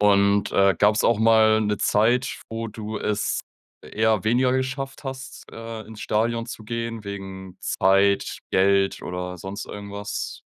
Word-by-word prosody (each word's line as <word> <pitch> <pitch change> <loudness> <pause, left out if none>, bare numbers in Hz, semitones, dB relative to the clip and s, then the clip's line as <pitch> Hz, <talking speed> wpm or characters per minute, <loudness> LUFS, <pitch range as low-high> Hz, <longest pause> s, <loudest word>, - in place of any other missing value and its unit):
Und, 100 0 +3
äh, 100 -1 +4
gab's 105 +1 +4
auch 115 - +3
mal 110 -1 +5
'ne 105 -1 0
Zeit, 120 +5 +2
wo 115 0 -4
du 110 0 -6
es 105 0 -1 0.4
eher 110 -3 +1
weniger 125 +3 +3
geschafft 130 +2 -3
hast, 135 0 -7
äh, 115 -1 -7
ins 110 -1 -11
Stadion 115 +2 0
zu 115 -2 -8
gehen 115 -1 -4
wegen 95 -2 -7
Zeit, 100 -1 +2
Geld 95 +1 +2
oder 90 0 -5
sonst 95 +3 -6
irgendwas? 100 0 -6
105 Hz, 140 wpm, -24 LUFS, 100-115 Hz, 0.4 s, mal